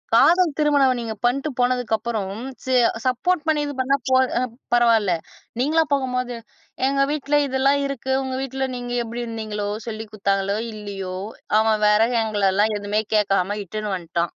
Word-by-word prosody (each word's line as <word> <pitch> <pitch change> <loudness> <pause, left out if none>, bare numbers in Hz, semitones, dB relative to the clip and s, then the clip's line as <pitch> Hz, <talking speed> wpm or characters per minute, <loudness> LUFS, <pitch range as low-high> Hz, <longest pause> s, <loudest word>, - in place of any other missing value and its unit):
காதல் 335 +7 +5
திருமணம் 285 -4 +3
நீங்க 225 -2 -4
பண்ணிட்டு 275 +5 +1
போனதுக்கு 245 -2 +1
அப்புறம் 215 -3 -3 0.4
செ 260 - 0 0.3
சப்போர்ட் 300 +7 +1
பண்ணி 305 -2 +2
இது 285 - -4
பண்ணா 265 +2 +2
போ 260 - +4 0.2
அ - - 0 0.3
பரவாயில்லை. 225 -6 +4 0.4
நீங்களா 315 +5 +3
போகும்போது 250 -2 -1 0.5
"எங்க 275 0 +2
வீட்ல 295 0 0
இதெல்லாம் 270 +2 +2
இருக்கு. 265 -1 -4
உங்க 260 0 -3
வீட்ல 265 0 -2
நீங்க 245 0 -5
எப்படி 235 +1 -5
இருந்தீங்களோ, 215 -2 -4 0.2
சொல்லிக் 220 -1 -6
கொடுத்தாங்களோ 200 0 0 0.2
இல்லையோ, 195 -3 -6 0.4
அவன் 220 -1 +2
வேற 210 +1 +4 0.2
எங்கள 210 -2 -2
எல்லாம் 210 +2 +2
எதுவுமே 205 +1 0
கேட்காம 200 -1 +1
இட்டுனு 210 +1 -3
வந்துட்டான்." 170 -1 -2
235 Hz, 150 wpm, -22 LUFS, 210-270 Hz, 0.5 s, காதல்